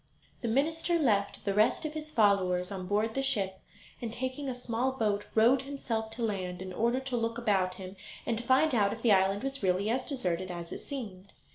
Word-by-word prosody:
The 235 - -2
minister 320 +8 +1
left 210 -10 +1
the 200 - +1
rest 215 +9 +3
of 305 - -3
his 310 0 -6
followers 195 -7 +2
on 185 -2 -5
board 210 +3 +1
the 270 - 0
ship, 200 -9 0 0.4
and 235 -2 -3
taking 260 +3 -3
a 255 - -3
small 245 +1 -1
boat 210 -5 0
rowed 240 +4 +5
himself 250 -5 -3
to 235 - -4
land, 185 -5 -2
in 185 0 -6
order 235 +6 +1
to 265 -1 -3
look 230 0 -1
about 195 -6 +1
him 185 0 -8 0.3
and 230 - 0
to - - -4
find 260 +5 +4
out 205 -4 +3
if - - -9
the 235 - +5
island 195 +2 +3
was 275 0 -3
really 190 +2 +1
as 255 +2 0
deserted 185 - -2
as 170 -1 -6
it - - -5
seemed. 205 -9 -7
225 Hz, 215 wpm, -30 LUFS, 195-260 Hz, 0.4 s, rowed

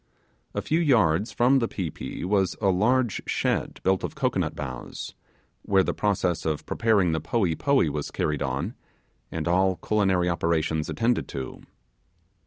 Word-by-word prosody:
A - - -1
few 160 - +1
yards 110 - +3
from 130 +3 +4
the 115 - 0
pi 90 -9 -4
pi - - -6
was 95 -1 +1
a 100 - +2
large 115 +5 +2
shed - - -1
built 95 0 +2
of - - -4
cocoanut 95 - 0
boughs, 65 -4 -6 0.5
where 95 -1 +3
the - - -1
process 95 -4 0
of 80 -2 -2
preparing 105 -6 +2
the 80 -1 -1
'poee 90 +1 +1
poee' 140 - +2
was 75 0 -3
carried 75 -2 -1
on, - - -2 0.6
and 80 0 -3
all 95 +2 +3
culinary 95 -3 +1
operations 80 -2 0
attended 120 +1 0
to. 65 -2 -6
95 Hz, 155 wpm, -26 LUFS, 80-115 Hz, 0.6 s, from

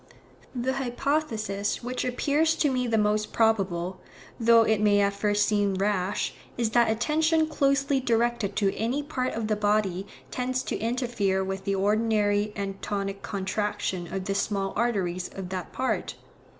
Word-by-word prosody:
The 250 +2 0
hypothesis 245 -6 -1
which 250 +1 -2
appears 295 +5 +1
to 295 -4 +2
me 250 -1 0
the 225 -1 +1
most 210 0 +1
probable, 190 -5 +1 0.4
though 230 0 +6
it 220 -1 +2
may 205 -1 +4
at 200 0 +2
first 205 +1 +1
seem 205 -2 +1
rash, 195 0 0 0.2
is 230 -2 0
that 235 -1 +4
attention 315 +8 +2
closely 275 -2 +1
directed 235 -4 0
to 195 -2 +1
any 245 +7 -1
part 255 -4 -2
of 225 0 -2
the 215 - +1
body 205 -2 0 0.2
tends 255 0 -1
to - - -3
interfere 225 -5 0
with 190 0 -4
the 195 - +1
ordinary 210 0 +2
and 195 -1 -4
tonic 195 -1 -3
contraction 190 -3 -2
of 190 0 -3
the 195 - -1
small 195 -1 -1
arteries 190 -6 0
of 190 -2 -6
that 185 -2 -5
part. 260 - -2
215 Hz, 155 wpm, -27 LUFS, 195-245 Hz, 0.4 s, though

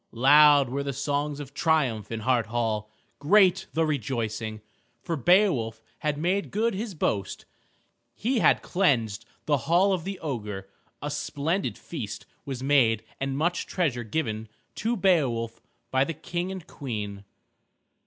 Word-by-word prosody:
Loud 145 +2 +7
were 140 +3 -2
the 140 0 -3
songs 145 +2 -1
of 140 -1 -8
triumph 140 - +1
in 115 -1 -3
Hart 120 -1 +2
Hall, 110 -2 -1 0.3
great 190 +3 +4
the 160 +2 +2
rejoicing, 115 -6 -2 0.4
for 165 - -2
Beowulf 145 - +3 0.2
had 150 -1 -1
made 185 +6 0
good 225 +3 0
his 205 0 -4
boast. 100 - -2 0.7
He 240 +3 0
had - - +4
cleansed 120 - +1 0.2
the 145 -2 +3
hall 185 +4 +4
of 180 -3 -2
the 195 +1 -4
ogre. 105 -10 -5 0.4
A 145 - -2
splendid 145 - -2
feast - - -6 0.2
was 130 -2 -5
made 125 -6 +3 0.2
and 135 0 -2
much 170 +3 0
treasure 140 -10 0
given 110 -3 -3 0.2
to 230 +2 -1
Beowulf 130 - +1 0.3
by 130 0 +3
the 165 +3 -3
King 175 +4 -3
and 190 -4 -7
Queen. 105 -7 -5
140 Hz, 145 wpm, -27 LUFS, 115-175 Hz, 0.7 s, Loud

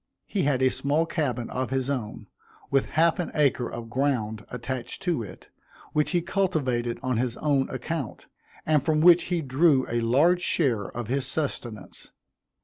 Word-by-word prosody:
He 200 - -2
had 135 -3 +1
a 130 - +5
small 145 +4 +1
cabin 130 -8 -2
of 130 -1 -2
his 135 0 -1
own, 125 -7 -4 0.5
with 135 -1 +2
half 165 +2 +4
an 175 - -2
acre 135 -5 +2
of 120 -1 -7
ground 120 -6 -1
attached 125 0 -5
to 175 -9 0
it, 100 -4 -10 0.4
which 150 0 +2
he 175 -2 +1
cultivated 140 -11 0
on 130 -3 0
his 120 0 -1
own 140 -3 +1
account, 135 0 -5 0.4
and 150 -3 +3
from 155 0 +2
which 175 0 +7
he 175 -2 -1
drew 135 0 +3
a 120 0 -1
large 150 +10 +3
share 125 - +1
of 120 -3 -4
his 135 +2 -1
sustenance. 120 - -5
135 Hz, 165 wpm, -26 LUFS, 120-155 Hz, 0.5 s, which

